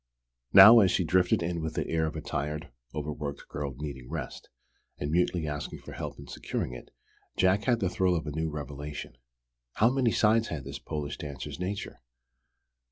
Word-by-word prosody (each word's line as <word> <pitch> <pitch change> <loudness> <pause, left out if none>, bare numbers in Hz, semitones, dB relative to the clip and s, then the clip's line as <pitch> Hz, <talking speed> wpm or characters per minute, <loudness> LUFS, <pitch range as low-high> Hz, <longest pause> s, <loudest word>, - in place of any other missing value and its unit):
Now, 105 +5 +11
as 95 -4 +5
she 90 - +1
drifted 90 +1 +2
in 85 0 -2
with 80 0 -4
the - - -1
air 80 -1 +1
of 80 - -5
a 80 - -4
tired, 75 +2 -4 0.2
overworked 75 -2 -5
girl 70 -2 -4
needing 70 -4 -7
rest, - - -6 0.5
and 75 0 -3
mutely 85 -1 +1
asking 75 -1 -5
for - - -10
help - - -6
in - - -10
securing 60 - -4
it, 60 - -10 0.5
Jack 95 +2 +3
had 120 -2 +3
the 95 - +2
thrill 90 0 +1
of 80 -1 -2
a 75 - -4
new 80 +2 -2
revelation. 75 -2 -6 0.6
How 115 +3 +4
many 130 -3 +2
sides 110 +1 +3
had 75 -4 -5
this - - -7
Polish 75 -2 -5
dancer's 70 +2 -7
nature? 95 +2 -4
80 Hz, 180 wpm, -29 LUFS, 75-95 Hz, 0.6 s, Now